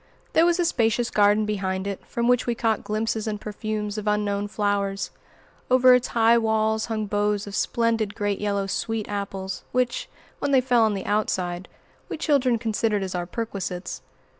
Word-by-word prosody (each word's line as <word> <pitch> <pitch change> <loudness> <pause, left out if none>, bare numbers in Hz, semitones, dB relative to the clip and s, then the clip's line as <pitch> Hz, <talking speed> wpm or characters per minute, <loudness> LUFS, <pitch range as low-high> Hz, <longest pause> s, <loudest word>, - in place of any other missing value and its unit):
There 330 +1 +5
was 345 +1 +2
a 350 - +3
spacious 235 -5 +1
garden 210 +1 +4
behind 190 -2 -2
it, 200 -1 -4
from 235 0 -1
which 245 0 +3
we 240 - +1
caught 225 -2 0
glimpses 220 +1 -2
and 210 -1 -2
perfumes 210 0 -4
of 210 - -7
unknown 205 -1 0
flowers. 200 -1 -1 0.6
Over 255 0 +7
its 250 0 +3
high 230 0 +4
walls 220 -1 +1
hung 220 -2 -2
boughs 205 0 0
of 205 - -8
splendid 230 -3 0
great 205 -1 -1
yellow 200 -1 0
sweet 220 +2 -2
apples, 195 -2 -4
which, 250 -1 0 0.3
when 285 - -1
they 270 -2 +5
fell 250 -2 +3
on 215 -2 +1
the 195 - -5
outside, 185 -4 -1 0.4
we - - -4
children 275 -6 +2
considered 220 -2 0
as 190 - -4
our 175 -1 -3
perquisites. 195 -4 -4
215 Hz, 175 wpm, -24 LUFS, 200-230 Hz, 0.6 s, Over